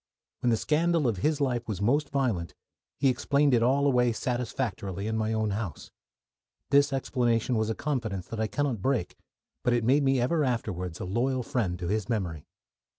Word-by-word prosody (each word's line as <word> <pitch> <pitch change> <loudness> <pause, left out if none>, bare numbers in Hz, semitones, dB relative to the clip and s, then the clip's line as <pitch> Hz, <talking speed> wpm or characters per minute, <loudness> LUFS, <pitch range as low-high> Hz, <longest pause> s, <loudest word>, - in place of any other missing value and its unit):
When 125 - +1
the 115 - +3
scandal 160 +1 +2
of 110 -5 0
his 150 - +1
life 125 -4 0
was 105 -5 -3
most 140 +8 +1
violent, 115 - -1 0.4
he 140 - +2
explained 140 +2 +2
it 120 - +4
all 135 +4 +3
away 125 -3 +3
satisfactorily 110 -5 -3
in 110 0 -1
my 110 0 0
own 110 -1 0
house. 100 -6 -5 0.8
This 140 0 +5
explanation 125 -3 0
was 110 0 0
a 110 - -1
confidence 115 -11 -2
that 115 - -5
I 110 - +1
cannot 135 -3 -1
break, 120 -6 0 0.5
but 125 - +2
it 120 -1 +1
made 135 +6 +4
me 135 -1 +2
ever 150 +6 +1
afterwards 95 - -2
a - - -4
loyal 125 +7 0
friend 110 - -1
to 90 -1 -4
his 105 +3 -1
memory. 90 -10 -2
120 Hz, 185 wpm, -28 LUFS, 105-135 Hz, 0.8 s, This